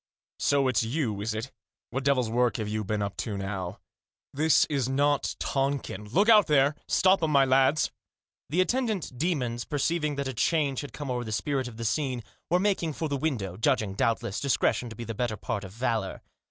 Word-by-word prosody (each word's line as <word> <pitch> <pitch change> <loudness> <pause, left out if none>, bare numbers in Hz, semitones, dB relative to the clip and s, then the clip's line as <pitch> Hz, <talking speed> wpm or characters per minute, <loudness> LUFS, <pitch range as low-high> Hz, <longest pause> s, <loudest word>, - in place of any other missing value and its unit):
" - - -70
So 140 -2 +3
it's 130 -5 +2
you, 115 -4 -1
is 110 +1 -2
it? 115 +5 -4 0.4
What 135 +2 -2
devil's 130 -5 +2
work 120 +1 +2
have 110 -2 -3
you 110 0 -2
been 105 +1 -1
up 100 -1 -4
to 105 -3 -3
now? 95 -2 -4 0.6
This 155 +3 +4
is 135 -4 -1
not 145 +1 +1
Tongkin! 135 -7 -2
Look 200 - +3
out 215 -3 +7
there— 145 -1 +4
stop 190 0 +4
'em, 160 - +1
my 140 -2 +5
lads! 135 +3 +3 0.3
" - - -69
The 170 +6 +2
attendant 220 - -1
demons, 125 -6 -1
perceiving 150 +1 -1
that 140 -1 -2
a 130 - -3
change 140 +1 +1
had 145 - -8
come 145 -3 -5
o'er 125 -1 -1
the 110 - -6
spirit 130 +3 -1
of 115 -2 -10
the 115 - -4
scene, 130 -1 -1 0.3
were 175 - +4
making 185 -5 0
for 160 +1 -3
the 140 - 0
window, 125 - -2
judging, 110 -4 +1
doubtless, 110 0 0
discretion 130 -3 +1
to 110 - -9
be 120 - -6
the 115 0 -5
better 110 -1 -2
part 100 +1 -3
of 95 - -8
valour. 115 -3 -2
130 Hz, 205 wpm, -28 LUFS, 110-150 Hz, 0.6 s, out